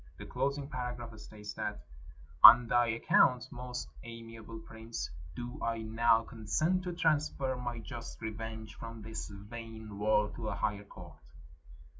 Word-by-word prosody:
The - - -8
closing 140 +2 -1
paragraph 125 -4 -5
states 105 -1 -9
that 105 0 -4 0.3
— 75 0 -22
"On 120 +1 +12
thy 120 +1 +4
account, 125 +2 +4
most 125 -1 -5 0.2
amiable 115 -1 -9
prince, 110 - -6 0.2
do 120 +5 -6
I 115 -1 -1
now 115 +1 +3
con 110 -2 -11
sent 175 - +2
to 180 - -2
transfer 150 -5 +1
my 120 -1 -4
just 115 +1 -8
revenge 110 0 -5
from 115 -1 -8
this 110 +1 -5
vain 110 +1 -9
world 105 0 +2
to 110 -2 -3
a - - -2
higher 105 -1 -1
court." - - -12
115 Hz, 150 wpm, -33 LUFS, 110-125 Hz, 0.3 s, On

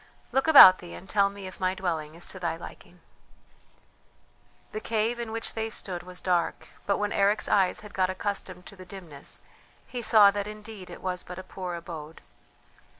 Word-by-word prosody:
"Look 270 +3 +1
about 190 -12 +10
thee 175 -1 -9
and 190 - -12
tell 200 0 +3
me 200 -1 -9
if 185 - -9
my 185 0 0
dwelling 160 -5 -3
is 170 - -3
to 185 - -8
thy 170 -2 -1
liking." 165 - -12 1.7
The 215 - -4
cave 225 +2 -1
in 235 -2 -4
which 225 0 -4
they 225 0 -2
stood 185 -5 -5
was 180 +1 -10
dark; 180 -2 0 0.2
but 200 - +2
when 210 0 -1
Eric's 200 +2 +2
eyes 190 -2 +2
had 210 -1 -12
got 185 -1 +1
accustomed 185 -1 -4
to 200 - -12
the 185 - -11
dimness 180 -6 -9 0.4
he 245 - -5
saw 215 -3 +7
that 205 0 -3
indeed 210 -2 -9
it - - -11
was 180 -1 -2
but 180 - -9
a 185 - -7
poor 180 -2 -6
abode. 165 -2 -8
190 Hz, 190 wpm, -27 LUFS, 180-210 Hz, 1.7 s, about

